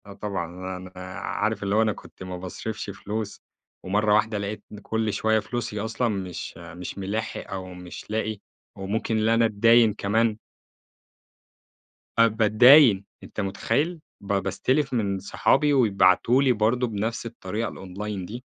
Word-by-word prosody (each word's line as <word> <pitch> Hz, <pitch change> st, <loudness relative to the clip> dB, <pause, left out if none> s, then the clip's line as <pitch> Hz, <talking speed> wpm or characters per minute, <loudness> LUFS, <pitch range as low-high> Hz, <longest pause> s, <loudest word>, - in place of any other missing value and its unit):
آه 100 Hz, -, -10 dB
طبعًا. 95 Hz, -2 st, -5 dB
أنا 90 Hz, 0 st, -10 dB, 0.3 s
عارف 105 Hz, +1 st, -2 dB
اللي 100 Hz, +1 st, 0 dB
هو 110 Hz, -, +5 dB
أنا 110 Hz, -1 st, +2 dB
كنت -, -, -13 dB
ما 90 Hz, -1 st, -6 dB
باصرفش 105 Hz, +4 st, -6 dB
فلوس 105 Hz, +1 st, -5 dB, 0.4 s
ومرّة 105 Hz, +3 st, +2 dB
واحدة 105 Hz, 0 st, +2 dB
لقيت 100 Hz, +1 st, -4 dB
إن 105 Hz, -, -9 dB
كل 110 Hz, 0 st, -1 dB
شوية 110 Hz, 0 st, +2 dB
فلوسي 115 Hz, -2 st, -4 dB
أصلًا 110 Hz, +3 st, -1 dB
مش 95 Hz, -6 st, -4 dB
مش 85 Hz, +2 st, -8 dB
مِلاحق 110 Hz, +4 st, -4 dB
أو 95 Hz, -1 st, -5 dB
مش 90 Hz, -1 st, -10 dB
لاقي 110 Hz, 0 st, -1 dB, 0.4 s
وممكن 110 Hz, +3 st, -2 dB
اللي 110 Hz, +1 st, +3 dB
أنا 115 Hz, 0 st, +4 dB
أتداين 115 Hz, +1 st, +5 dB
كمان. 110 Hz, +2 st, +1 dB, 1.8 s
آه 115 Hz, -, +8 dB
باتداين، 110 Hz, +1 st, +6 dB, 0.2 s
أنت -, -, -5 dB
مُتخيّل؟ 145 Hz, -, -1 dB, 0.2 s
ب 100 Hz, 0 st, -3 dB
باستلف 130 Hz, +9 st, 0 dB
من 100 Hz, -5 st, 0 dB
صحابي 135 Hz, +9 st, +2 dB
ويبعتوا 115 Hz, 0 st, +4 dB
لي 135 Hz, -2 st, +4 dB
برضه 120 Hz, +3 st, +1 dB
بنفس 110 Hz, +2 st, -3 dB
الطريقة 115 Hz, -1 st, -4 dB
الonline 95 Hz, +1 st, -6 dB
دي. 120 Hz, +7 st, -8 dB
105 Hz, 145 wpm, -25 LUFS, 95-115 Hz, 1.8 s, آه